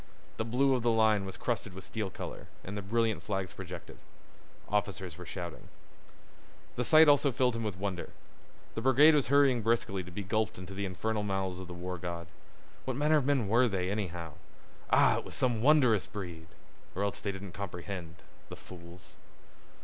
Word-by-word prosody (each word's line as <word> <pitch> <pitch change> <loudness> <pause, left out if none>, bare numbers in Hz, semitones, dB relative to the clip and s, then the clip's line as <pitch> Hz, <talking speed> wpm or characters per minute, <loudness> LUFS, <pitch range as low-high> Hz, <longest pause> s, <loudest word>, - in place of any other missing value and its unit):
The - - 0
blue 130 +4 +2
of 125 - +1
the 120 - +2
line 110 -3 +3
was 95 - -7
crusted 110 -6 -2
with 95 - -8
steel 105 +1 -3
color, - - -7 0.2
and 95 - -6
the 105 - -3
brilliant 110 +2 0
flags 95 -3 -3
projected. 90 -2 -9 0.7
Officers 100 -4 -2
were 90 0 -10
shouting. 85 -3 -7 1.1
This 125 - -1
sight 155 0 +8
also 145 -1 +5
filled 125 0 +1
him 115 - -3
with 105 -5 -3
wonder. 95 -2 -3 0.6
The 115 - -3
brigade 135 +5 +6
was 145 -3 +3
hurrying 140 -3 +4
briskly 110 -4 0
to 90 - -10
be 100 +3 -5
gulped 110 +2 -1
into 90 +1 -8
the 100 +1 -3
infernal 105 +4 -2
mouths 95 -2 -2
of 95 - -7
the 90 - -8
war 90 0 -5
god. 85 -1 -5 0.6
What 130 -1 -2
manner 150 +2 +4
of 140 -3 0
men 135 -7 +2
were 120 +5 +4
they, 95 -3 -1
anyhow? 90 -6 -4 0.6
Ah, - - +5
it - - -8
was - - -9
some 120 -4 +1
wondrous 130 -7 +4
breed! 85 -5 -7 0.5
Or 100 - -1
else 100 - -2
they 100 - -2
didn't 95 -1 -8
comprehend—the 90 -2 -8
fools. 85 0 -13
100 Hz, 180 wpm, -31 LUFS, 90-120 Hz, 1.1 s, sight